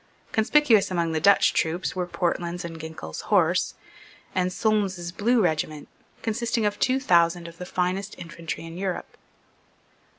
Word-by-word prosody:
Conspicuous 225 Hz, -1 st, +4 dB
among 170 Hz, -3 st, 0 dB
the 160 Hz, -, 0 dB
Dutch 200 Hz, +5 st, +5 dB
troops 170 Hz, +4 st, -1 dB
were 180 Hz, -1 st, -2 dB
Portland's 175 Hz, -1 st, -2 dB
and 165 Hz, -1 st, -7 dB
Ginkell's 160 Hz, -, -7 dB
Horse, -, -, +3 dB, 0.6 s
and 185 Hz, -1 st, +1 dB
Solmes's 190 Hz, -4 st, 0 dB
Blue 225 Hz, +4 st, +2 dB
regiment, 155 Hz, -3 st, -1 dB, 0.4 s
consisting 230 Hz, 0 st, 0 dB
of 205 Hz, 0 st, -1 dB
two 260 Hz, +1 st, +2 dB
thousand 170 Hz, -6 st, +3 dB
of 165 Hz, 0 st, -12 dB
the 180 Hz, -, -6 dB
finest 185 Hz, +3 st, -2 dB
infantry 165 Hz, -1 st, -6 dB
in 165 Hz, +2 st, -8 dB
Europe. 190 Hz, -2 st, -4 dB
180 Hz, 140 wpm, -25 LUFS, 170-205 Hz, 0.6 s, Dutch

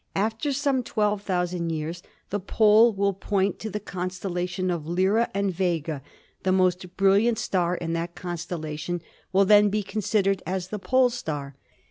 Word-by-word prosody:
After 220 Hz, +8 st, 0 dB
some 275 Hz, -1 st, +1 dB
12,000 185 Hz, -6 st, -1 dB
years 165 Hz, +2 st, -3 dB, 0.3 s
the 205 Hz, -, 0 dB
pole 215 Hz, +4 st, +5 dB
will 200 Hz, -1 st, 0 dB
point 195 Hz, 0 st, -1 dB
to 220 Hz, -, -4 dB
the 210 Hz, -, -3 dB
constellation 185 Hz, -1 st, -3 dB
of 160 Hz, -3 st, -3 dB
Lyra, 190 Hz, +7 st, +2 dB
and 200 Hz, -1 st, -1 dB
Vega, 165 Hz, -5 st, -1 dB, 0.4 s
the 185 Hz, -, +1 dB
most 185 Hz, -1 st, +1 dB
brilliant 200 Hz, +4 st, +4 dB
star 180 Hz, -5 st, 0 dB
in 165 Hz, -1 st, -3 dB
that 170 Hz, +1 st, -3 dB
constellation, 170 Hz, -1 st, -4 dB, 0.3 s
will 195 Hz, +1 st, +4 dB
then 205 Hz, +1 st, +6 dB
be 210 Hz, +1 st, -1 dB
con 215 Hz, +2 st, -4 dB
sidered 195 Hz, -1 st, +1 dB
as 185 Hz, 0 st, -3 dB
the 210 Hz, -, -4 dB
pole 255 Hz, +4 st, +3 dB
star. 145 Hz, -, -5 dB
190 Hz, 155 wpm, -25 LUFS, 175-210 Hz, 0.4 s, then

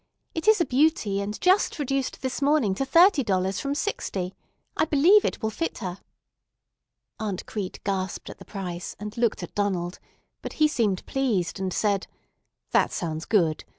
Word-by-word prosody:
It 325 Hz, +4 st, -4 dB
is 435 Hz, -2 st, +6 dB
a 340 Hz, -, +3 dB
beauty, 250 Hz, -8 st, +2 dB
and 205 Hz, +2 st, -4 dB
just 370 Hz, +1 st, +3 dB
reduced 275 Hz, -3 st, -2 dB
this 260 Hz, +2 st, -2 dB
morning 280 Hz, -8 st, +3 dB
to 270 Hz, +8 st, -2 dB
thirty 335 Hz, +2 st, +5 dB
dollars 190 Hz, -2 st, 0 dB
from 280 Hz, 0 st, -2 dB
sixty. 195 Hz, -, -3 dB, 0.4 s
I -, -, +2 dB
believe 325 Hz, +8 st, +5 dB
it -, -, -2 dB
will 220 Hz, -, 0 dB
fit 330 Hz, +8 st, -3 dB
her." 185 Hz, -3 st, -5 dB, 1.2 s
Aunt 205 Hz, -4 st, -3 dB
Crete 200 Hz, -4 st, -5 dB
gasped 190 Hz, -2 st, -2 dB
at -, -, -9 dB
the -, -, -10 dB
price, 180 Hz, -3 st, -6 dB
and 210 Hz, +1 st, -6 dB
looked 235 Hz, -1 st, 0 dB
at -, -, -8 dB
Donald; 185 Hz, -3 st, -1 dB, 0.4 s
but -, -, -6 dB
he 310 Hz, -, +4 dB
seemed 215 Hz, -10 st, 0 dB
pleased, 220 Hz, -10 st, -1 dB
and 190 Hz, -1 st, -2 dB
said: 200 Hz, 0 st, 0 dB, 0.6 s
"That -, -, +3 dB
sounds 160 Hz, -2 st, -3 dB
good. 170 Hz, -8 st, +2 dB
210 Hz, 170 wpm, -26 LUFS, 190-285 Hz, 1.2 s, is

